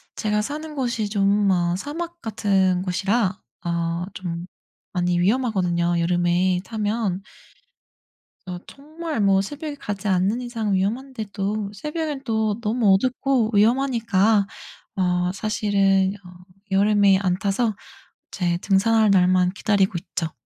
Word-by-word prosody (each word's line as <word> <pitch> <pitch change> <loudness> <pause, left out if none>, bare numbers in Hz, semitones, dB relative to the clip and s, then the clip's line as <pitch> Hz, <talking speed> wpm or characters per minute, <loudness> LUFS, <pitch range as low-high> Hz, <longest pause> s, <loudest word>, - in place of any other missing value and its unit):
제가 210 -1 0
사는 300 +6 -5
곳이 235 -6 -1
좀 200 0 +2
어 175 -1 +1
사막 335 - -6
같은 195 -4 +1
곳이라 195 +2 0 0.3
어 170 0 -1
좀 175 -3 -5 0.5
많이 175 -1 +1
위험하거든요 180 -5 +1
여름에 175 +1 +2
타면. 210 -2 -2 1.3
어 180 - -4
정말 310 +1 -6
뭐 195 -2 +4
새벽에 290 +7 -6
가지 205 -6 -5
않는 190 +4 +1
이상 230 -4 -2
위험한데도 210 -1 -2
새벽에는 300 - -4
또 220 -3 0
너무 215 -2 +3
어둡고 255 +2 +1
위험하니까 225 -3 +3 0.5
어 180 -1 +1
사실은 195 -2 +1
어 - - -11 0.4
여름에 200 0 +4
안 180 -2 +1
타서 215 +2 0 0.6
이제 175 -3 0
등산할 215 +2 +3
날만 180 -1 +4
기다리고 200 -1 +1
있죠. 165 -1 -4
200 Hz, 255 characters per minute, -23 LUFS, 185-230 Hz, 1.3 s, 뭐